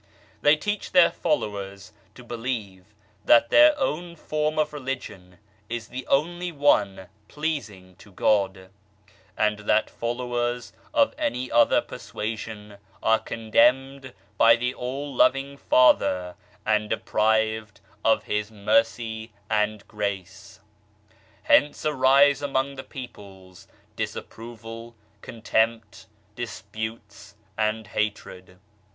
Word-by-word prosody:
They 145 +1 +6
teach 205 +7 -4
their 180 -2 +6
followers 100 -7 -3 0.2
to 125 - -12
believe 115 -6 -5 0.4
that 115 +1 +5
their 300 0 +7
own 175 - -2
form 155 -1 -2
of 155 -1 0
Religion 130 -10 -6 0.3
is 120 0 -5
the 130 0 -7
only 175 +5 0
one 105 - +2 0.2
pleasing 110 - -5
to 105 -1 -17
God, 95 -1 0 0.7
and 105 0 +1
that 105 +1 +1
followers 120 0 -3 0.2
of 290 -2 +3
any 285 - -2
other 120 0 +4
persua 110 +2 -5
sion 105 -1 -9 0.3
are 110 0 +4
condemned 130 +4 +1 0.3
by 115 - +7
the 125 +1 -2
All 135 +3 -5
Loving 135 +2 +2
Father 95 -10 +3 0.3
and 105 0 +1
deprived 110 0 0 0.2
of - - +3
His 105 0 -2
Mercy 110 +1 0 0.2
and 105 -1 0
Grace. 100 -4 -5 0.8
Hence 145 +3 +3
arise 140 0 +4
among 140 -1 -1
the 130 -1 -8
peoples, 95 -8 -11 0.3
disapproval, 115 0 -7 0.3
contempt, 115 -1 -1 0.3
disputes 110 -2 -7 0.2
and 110 +1 -1
hatred. 100 -4 -4
115 Hz, 105 wpm, -25 LUFS, 105-135 Hz, 0.8 s, their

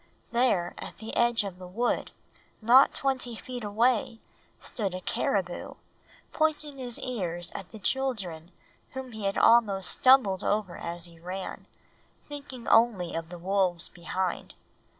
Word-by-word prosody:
There 235 -8 +2
at - - -8
the 220 - -7
edge 235 -2 +3
of 190 -2 -7
the 180 - -8
wood, 235 +7 -1 0.5
not 245 +5 +6
twenty 260 -3 0
feet 245 +1 -7
away, 230 +3 +1 0.4
stood 195 -5 -2
a 185 - -5
caribou, 180 -1 -1 0.6
pointing 300 -3 0
his 245 -2 -2
ears 175 -9 -3
at 190 - -8
the 220 - -9
children 200 -9 -2 0.4
whom 265 -1 -6
he 220 -2 -6
had 195 - 0
almost 205 -5 +4
stumbled 255 -8 +5
over 205 -4 0
as 170 0 -5
he 170 -1 -12
ran, 185 +3 -6 0.6
thinking 280 -4 -8
only 225 -7 +4
of 165 0 -4
the 175 - -8
wolves 180 -1 0
behind. 180 +1 -3
210 Hz, 140 wpm, -28 LUFS, 180-245 Hz, 0.6 s, not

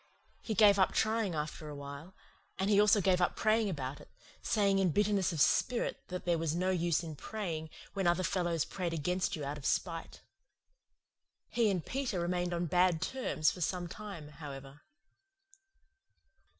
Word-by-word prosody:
He 220 - -3
gave 200 0 +6
up 190 - +3
trying 220 -5 +1
after 150 0 -4
awhile; 140 +5 -8 0.4
and 195 +2 0
he 205 0 +6
also 210 0 +5
gave 185 -1 +3
up 175 - +2
praying 220 -1 +2
about 140 -5 -4
it, - - -15 0.3
saying 200 -3 +2
in 190 -2 +3
bitterness 200 +1 +2
of 165 - -4
spirit 240 - +2
that 180 0 -6
there 170 -2 +2
was 165 -1 -1
no 185 +2 +1
use 175 -2 +1
in 160 -2 -6
praying 160 -2 -5 0.2
when 195 -3 0
other 175 +2 +2
fellows 175 -4 0
prayed 180 -3 -3
against 180 +5 -1
you 150 -3 -5
out 145 +2 -4
of 140 - -11
spite. 165 -2 -2 1.3
He 230 -3 +2
and 185 -4 -1
Peter 255 -8 -2
remained 175 +1 -1
on 175 0 -1
bad 175 0 +3
terms 180 -5 0
for 180 - -9
some 180 +1 -1
time, 170 -5 -8
however. 140 -2 -10
180 Hz, 165 wpm, -32 LUFS, 160-200 Hz, 1.3 s, gave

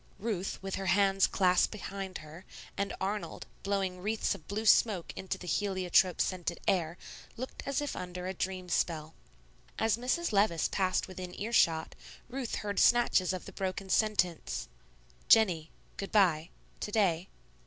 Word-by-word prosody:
Ruth, 195 -3 -3
with 195 0 -3
her 190 - -3
hands 195 0 +4
clasped 180 -1 +3
behind 195 -2 -5
her, 160 +4 -11 0.3
and 200 0 -1
Arnold, 190 -3 -3 0.2
blowing 195 -2 -1
wreaths 215 +4 0
of 155 - -11
blue 215 +2 -3
smoke 205 -5 +4
into 190 - -4
the - - -10
heliotrope 185 -1 +2
scented 175 -2 -1
air, 175 -2 +1 0.4
looked 255 +3 -6
as 275 +1 0
if 290 - -3
under 180 0 -6
a 190 - -2
dream 185 0 -3
spell. 160 -2 -1 0.6
As 225 0 +2
Mrs. 255 +7 0
Levice 200 -6 +2
passed 185 -2 0
within 185 -1 -8
ear 225 +3 -3
shot, 160 -6 +3 0.4
Ruth 255 -2 -3
heard 205 -1 -1
snatches 240 -7 +4
of 185 -1 -5
the - - -9
broken 190 0 -3
sentence, 180 -6 +1 0.6
"Jennie 180 -8 +5 0.3
good 195 - -5
by 170 -6 +3 0.3
to 210 - -4
day." 190 -5 +1
190 Hz, 155 wpm, -31 LUFS, 180-210 Hz, 0.6 s, Jennie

